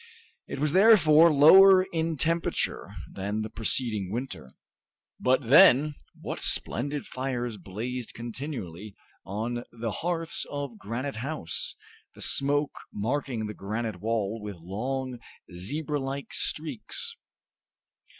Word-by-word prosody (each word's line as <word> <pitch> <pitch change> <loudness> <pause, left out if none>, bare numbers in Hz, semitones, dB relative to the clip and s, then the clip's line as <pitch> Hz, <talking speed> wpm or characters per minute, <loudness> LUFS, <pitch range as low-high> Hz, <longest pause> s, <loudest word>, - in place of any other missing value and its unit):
It - - -5
was 150 +1 0
therefore 170 -6 +7
lower 185 +6 +8
in 160 -1 -1
temperature 165 +3 -1 0.2
than 100 +3 -3
the 110 - -6
preceding 110 -3 0
winter. 115 - -6 0.6
But 130 -1 +2
then, 150 0 +7 0.3
what - - -5
splendid 140 +4 -1
fires 125 -3 -3
blazed 115 +7 -6
continually 110 - -7 0.3
on 115 +5 -3
the 115 -1 -4
hearths 165 +4 -1
of 140 -6 -5
Granite 120 +5 -4
House, 130 - -3 0.4
the - - -12
smoke 145 +1 +1
marking 120 +1 -2
the 105 - -5
granite 105 -1 -4
wall 110 -1 -1
with 105 -1 -6
long, 125 +9 -4 0.3
zebra 145 - -3
like 135 +1 -5
streaks! 240 - -3
125 Hz, 110 wpm, -27 LUFS, 110-150 Hz, 0.6 s, lower